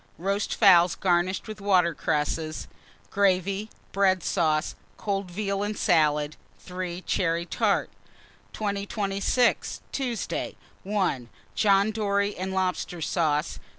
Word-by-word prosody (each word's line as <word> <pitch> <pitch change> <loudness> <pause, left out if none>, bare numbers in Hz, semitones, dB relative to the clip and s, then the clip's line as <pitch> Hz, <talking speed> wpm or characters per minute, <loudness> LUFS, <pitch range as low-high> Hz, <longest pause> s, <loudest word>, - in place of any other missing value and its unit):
Roast 195 +5 -1
fowls 175 -5 +6
garnished 180 +3 0
with 215 -1 -8
water 185 -4 +3
cresses; 155 +2 -2 0.4
gravy, 195 +1 +1 0.2
bread 190 -3 +2
sauce; 155 -3 +1 0.2
cold 195 -2 -2
veal 200 +2 -2
and 205 0 -2
salad. 150 -4 +2 0.2
3. 180 -1 -6
Cherry 170 -2 0
tart. - - 0 0.6
2026. 200 +3 0
Tuesday. 250 -5 -3 0.3
1. 185 - -1 0.2
John 200 0 +3
dory 200 -1 0
and 190 +1 -4
lobster 185 -2 -1
sauce. 155 -2 0
190 Hz, 105 wpm, -26 LUFS, 170-200 Hz, 0.6 s, fowls